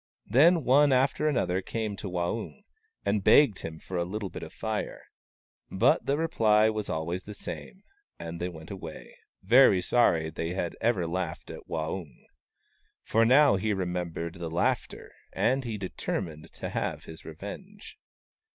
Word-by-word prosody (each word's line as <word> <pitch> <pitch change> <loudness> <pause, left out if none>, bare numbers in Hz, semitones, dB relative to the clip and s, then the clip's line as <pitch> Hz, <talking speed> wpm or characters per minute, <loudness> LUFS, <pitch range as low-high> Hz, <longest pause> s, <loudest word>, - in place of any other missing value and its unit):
Then 160 - +5
one 140 +3 +5
after 135 +4 +2
another 95 -10 0
came 110 +1 -3
to 95 - -5
Waung, 90 - -3 0.4
and 100 -1 +1
begged 120 -6 +5
him 80 -1 -7
for 90 +3 -6
a 85 - +1
little 100 +2 -5
bit - - -7
of - - -8
Fire. - - -4 0.7
But - - +2
the 140 - +2
reply 110 -9 +3
was 110 -1 -4
always 85 +3 -3
the 105 - -8
same, 190 - -8 0.3
and 85 0 -7
they 90 - -1
went 80 0 -11
away, 85 -5 -9 0.3
very 110 -1 +6
sorry 90 -3 +3
that - - -14
they 85 +1 -2
had 85 -3 -2
ever 110 -6 +1
laughed 85 -1 -4
at - - -10
Waung. 80 -2 -5 0.8
For 115 +1 +3
now 135 -1 +6
he 105 +2 0
remem 90 -2 -2
bered 85 +1 -6
the 85 -1 -4
laughter, 85 +2 -1 0.2
and 130 +3 +1
he 110 -3 -3
determined 85 -5 -5
to - - -6
have - - -3
his 80 - -11
revenge. 185 - -10
95 Hz, 160 wpm, -28 LUFS, 85-120 Hz, 0.8 s, very